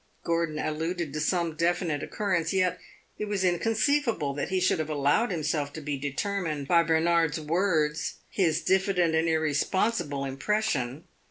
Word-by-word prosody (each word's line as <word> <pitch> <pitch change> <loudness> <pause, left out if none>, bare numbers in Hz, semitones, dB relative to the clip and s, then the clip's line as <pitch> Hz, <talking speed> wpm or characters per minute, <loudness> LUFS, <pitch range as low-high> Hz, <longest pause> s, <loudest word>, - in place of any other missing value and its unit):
Gordon 165 -2 0
alluded 160 0 -2
to 150 - -2
some 170 +1 0
definite 170 -3 0
occurrence, 180 -6 -1
yet 180 -1 +1 0.4
it 210 - -1
was 205 -2 -1
inconceivable 215 - +1
that 140 - -3
he 190 -1 +1
should 185 -2 +2
have 155 0 -2
allowed 145 +10 +2
himself 150 -4 -1
to - - -6
be 145 -1 -3
determined 150 +1 -3
by 170 +1 +5
Bernard's 165 -1 +2
words 155 -1 0
his 170 -4 0
diffident 190 -3 +2
and 160 +1 +2
irresponsible 160 0 0
impression. 140 - -1
165 Hz, 145 wpm, -27 LUFS, 150-185 Hz, 0.4 s, by